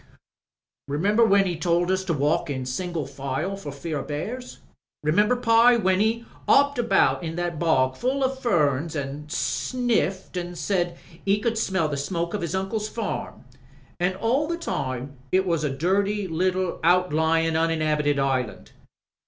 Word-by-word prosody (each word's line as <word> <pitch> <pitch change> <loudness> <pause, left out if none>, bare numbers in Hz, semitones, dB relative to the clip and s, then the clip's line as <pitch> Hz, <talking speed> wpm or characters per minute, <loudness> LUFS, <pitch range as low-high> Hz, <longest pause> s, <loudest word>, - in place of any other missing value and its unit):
Remember 200 +11 +2
when 200 -3 +4
*e 180 -2 -1
told 175 +2 +1
us 190 0 0
to 185 - -1
walk 150 +3 +1
in 130 -2 -3
single 160 +4 -3
file 140 +7 -3
for 175 -7 -7
fear 150 +2 -4
o* - - -4
bears? 225 +13 -5 0.5
'Remember, 205 +11 +3
Pye, 235 0 +5
when 190 -3 +2
*e 230 +2 0 0.2
*opped 285 -2 +4
about 195 -6 +3
in 165 -1 -4
that 175 -2 -3
bog 130 -6 +2
full 265 +3 -1
o' 260 - +3
ferns 165 - 0
an* 145 +1 -5
sniffed 210 - -1
an* 175 0 -4
said 175 -1 -1 0.3
*e 200 +1 +2
could 230 +1 0
smell 190 -7 +1
the 145 -2 -3
smoke 170 +4 -2
of 210 - -2
*is 170 +2 -2
uncle's 210 +3 -2
farm? 225 -3 -4 0.6
An* 180 +1 +1
all 250 +9 +1
the 340 +1 -2
time 130 - -4
it 190 +1 +3
was 165 -4 0
a 150 - +1
dirty 195 +8 0
little 185 +2 -1
out 180 0 +3
lyin* 160 +1 +2
uninhabited 155 -3 +1
island. 135 -4 -1
175 Hz, 160 wpm, -25 LUFS, 150-205 Hz, 0.6 s, Pye